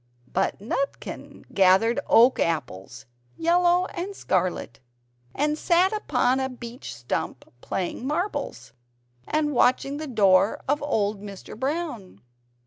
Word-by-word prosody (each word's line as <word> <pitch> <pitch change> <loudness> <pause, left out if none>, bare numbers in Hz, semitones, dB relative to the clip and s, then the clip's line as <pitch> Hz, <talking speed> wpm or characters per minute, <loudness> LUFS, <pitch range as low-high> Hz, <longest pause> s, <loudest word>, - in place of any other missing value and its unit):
But 190 +1 0
Nutkin 255 +7 -5
gathered 195 +6 +4
oak 245 +3 +5
apples 120 - -3 0.3
yellow 350 +2 +3
and 385 +3 -5
scarlet 180 - -1 0.6
and 300 +2 0
sat 360 +4 +3
upon 265 - +1
a 265 0 -1
beech 240 - -8
stump 120 +1 -4 0.2
playing 190 +7 -3
marbles, 345 +8 -3 0.5
and 300 -1 0
watching 275 +3 +2
the 310 0 -5
door 200 -5 +3
of 290 +2 +1
old 210 -8 -1
Mr. 200 -2 -9
Brown. 260 - -4
255 Hz, 115 wpm, -25 LUFS, 195-305 Hz, 0.6 s, oak